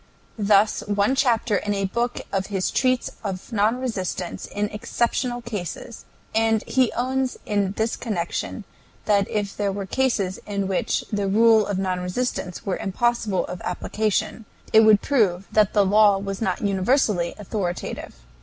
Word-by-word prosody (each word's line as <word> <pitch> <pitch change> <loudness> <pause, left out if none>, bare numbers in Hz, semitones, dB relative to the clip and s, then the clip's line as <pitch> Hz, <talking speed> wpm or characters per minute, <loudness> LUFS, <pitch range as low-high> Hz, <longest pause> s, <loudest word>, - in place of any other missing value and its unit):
Thus 205 +1 +4
one 205 +4 +2
chapter 240 -6 +2
in 205 +2 -2
a 195 0 0
book 235 +5 -2
of 195 -1 -1
his 195 -2 -1
treats 255 -1 +1
of 195 +3 -5
non 220 +4 +2
resistance 190 -8 -4
in 205 0 -2
exceptional 240 +3 -1
cases, 220 0 -6 0.3
and 225 -1 +2
he 260 -3 +2
owns 260 +1 -1
in 200 -2 0
this 220 +2 -1
connection 180 -8 -3 0.4
that 200 -2 +2
if 205 -2 -2
there 205 -1 0
were 195 0 -4
cases 200 -5 0
in 200 -2 -2
which 190 -1 -1
the 205 -1 0
rule 220 +1 +5
of 200 - -1
non 185 -1 -1
resistance 180 0 -3
were 195 - -1
impossible 215 0 0
of 180 - -7
application, 215 +1 -2 0.3
it 220 - +9
would 215 -2 +6
prove 195 -9 +2
that 215 -1 +3
the 205 -2 +4
law 205 0 +5
was 195 +1 -5
not 185 -5 -1
universally 200 -2 +1
authoritative. 190 - -4
205 Hz, 155 wpm, -23 LUFS, 195-230 Hz, 0.4 s, it